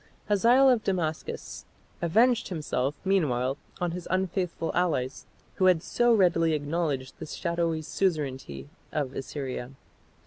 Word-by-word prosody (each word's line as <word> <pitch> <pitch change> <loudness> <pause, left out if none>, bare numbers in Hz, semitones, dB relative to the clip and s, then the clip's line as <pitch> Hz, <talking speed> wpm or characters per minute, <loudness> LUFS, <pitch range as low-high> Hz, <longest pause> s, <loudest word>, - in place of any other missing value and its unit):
Hazael 235 +6 +5
of 245 -4 +4
Damascus 165 -5 -3 0.4
avenged 230 +8 +3
himself 145 -5 -2
meanwhile 140 -8 +1 0.2
on 175 -2 0
his 175 0 -6
unfaithful 185 -2 -1
allies 150 -8 -1 0.3
who 190 - +3
had 180 -3 +4
so 240 0 +2
readily 175 -6 +4
acknowledged 145 -3 -2
the 160 - -6
shadowy 170 -1 -1
suzerainty 135 - -2 0.2
of 140 -4 -2
Assyria. 135 -2 -5
165 Hz, 115 wpm, -28 LUFS, 140-185 Hz, 0.4 s, Hazael